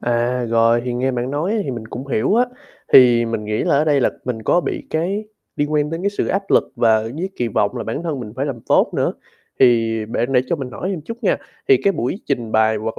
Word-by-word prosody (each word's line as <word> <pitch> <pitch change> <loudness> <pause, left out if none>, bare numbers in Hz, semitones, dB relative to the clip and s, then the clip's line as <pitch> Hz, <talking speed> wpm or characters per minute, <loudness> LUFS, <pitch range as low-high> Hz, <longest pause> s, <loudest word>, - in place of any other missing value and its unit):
À, 120 +1 0
rồi, 115 +1 +3
thì 125 - -2
nghe 125 +2 0
bạn 125 0 -3
nói 155 +8 -1
á 225 - 0
thì 140 - -3
mình 115 -3 -6
cũng 130 +4 -7
hiểu 135 - +1
á, 240 +2 +4 0.5
thì 120 -2 +7
mình 115 -2 -3
nghĩ 105 +1 -1
là - - +2
ở 150 - +3
đây 145 -3 +3
là - - +2
mình 120 -3 -4
có 175 - +3
bị - - -4
cái 185 +7 -1 0.3
liên 145 +1 -1
quan 150 0 +1
đến 165 +2 -4
cái 200 - +1
sự 205 - -2
áp 195 +2 0
lực - - +3
và 115 -1 +4
ở 110 +1 -3
dưới 175 +5 -3
kỳ 120 - -1
vọng 100 -1 0
là - - -4
bản 115 +8 -4
thân 155 -6 -3
mình 105 -3 -8
phải 135 +2 -1
làm 130 -5 -4
tốt - - +2
nữa, - - +1 0.5
thì 115 -3 +4
bạn 120 +3 -2
để 125 - +5
cho 170 - -1
mình 135 -4 -6
hỏi 185 - -5
thêm 185 -5 -3
chút 230 +10 -8
nha, - - +3 0.3
thì 400 - +7
cái 200 - +3
buổi 170 - -3
trình 120 -5 -2
bày 110 0 +3
hoặc 110 +1 -4
125 Hz, 270 wpm, -20 LUFS, 115-155 Hz, 0.5 s, thì